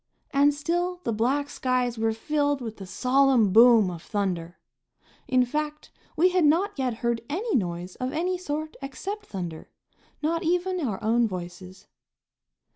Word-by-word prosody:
And 285 0 +4
still 350 +5 -2
the 230 - -1
black 260 +7 0
skies 250 -4 -1
were 225 0 +2
filled 285 +5 0
with 225 -3 -6
the 195 - -9
solemn 255 -2 +3
boom 225 -4 +7
of 170 -2 -8
thunder. 180 -5 -3 0.7
In 255 -2 +3
fact, 300 +3 -4 0.3
we 355 +4 +5
had 365 -1 +2
not 335 +8 +3
yet 255 -3 0
heard 235 -1 +1
any 405 +9 -1
noise 180 -4 -2
of 255 0 -3
any 355 +5 -1
sort 310 -3 -4
except 390 +10 -6
thunder, 175 -5 -6 0.5
not 330 +2 0
even 360 +2 0
our 235 - -2
own 230 +2 +3
voices. 180 0 -8
255 Hz, 150 wpm, -26 LUFS, 215-310 Hz, 0.7 s, boom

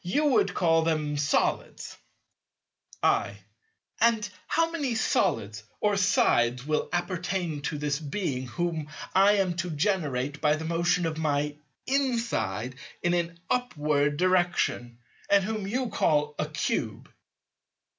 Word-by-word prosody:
You 285 - +1
would 280 -4 +2
call 165 -2 +3
them 155 -2 0
solids. 145 +1 -1 1.1
I. 100 0 +2 0.6
And 225 -2 +3 0.2
how 330 0 +1
many 285 -8 -1
solids 105 - 0 0.2
or 205 -1 +2
sides 160 - +2
will 155 0 -1
appertain 175 -2 -2
to 150 +1 -3
this 145 0 -1
Being 140 -5 -3
whom 160 +1 -3 0.2
I 195 +2 +6
am 190 -4 +1
to 180 0 -2
generate 150 -5 -1
by 150 0 +3
the 160 +1 -5
motion 170 +2 +1
of 160 -1 -2
my 150 -1 0 0.3
inside 235 - -1 0.3
in 175 0 +2
an 170 -1 -1
"upward" 150 -11 0
direction, 175 -9 +1 0.3
and 200 -1 +5
whom 215 -1 -3
you 250 +4 -1
call 150 -5 +1
a - - -1
Cube? - - -2
170 Hz, 125 wpm, -27 LUFS, 150-200 Hz, 1.1 s, I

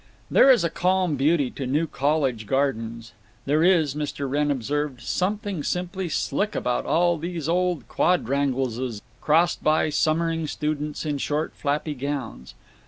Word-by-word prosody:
There 275 - +6
is 255 -7 +6
a 170 - +1
calm 180 -2 +1
beauty 140 -1 +2
to 135 - -5
New 150 +6 +1
College 140 -7 0
gardens. 115 -4 -1 0.3
There 150 +3 +2
is, 165 -6 +3
Mr. 145 -1 -3
Wrenn 145 +2 0
observed, 140 0 -2
"something 200 - -2
simply 180 +2 -2
slick 205 +6 -1
about 125 0 -1
all 175 0 +2
these 170 -2 -4
old 180 -1 0
quatrangleses," 130 -7 0 0.2
crossed 165 +3 +2
by 155 0 +2
summering 165 +1 +1
students 150 0 -3
in 145 -2 -2
short 150 +3 -2
flappy 150 +1 -2
gowns. 135 - -5
150 Hz, 140 wpm, -24 LUFS, 135-170 Hz, 0.3 s, There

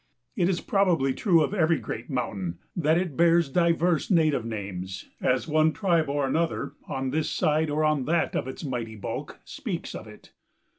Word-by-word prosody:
It 180 -5 +2
is 180 - 0
probably 175 -9 +2
true 170 - +3
of 150 - -2
every 165 -4 +3
great - - -6
mountain 95 - -3 0.2
that 160 -1 +2
it 175 -5 -2
bears 170 -1 +4
diverse 170 +1 +2
native 155 - +3
names 95 -4 -5
as 125 +3 +1
one 155 0 +3
tribe 170 -7 +1
or 145 0 0
another, 165 +5 -1
on 135 -1 -2
this 155 +2 0
side 155 +1 +1
or 150 +1 0
on 155 -4 +2
that 165 +2 +1
of - - -1
its 130 - -7
mighty 120 -6 -4
bulk, 105 - -6
speaks - - -5
of - - -8
it. - - -15
155 Hz, 180 wpm, -26 LUFS, 130-170 Hz, 0.2 s, bears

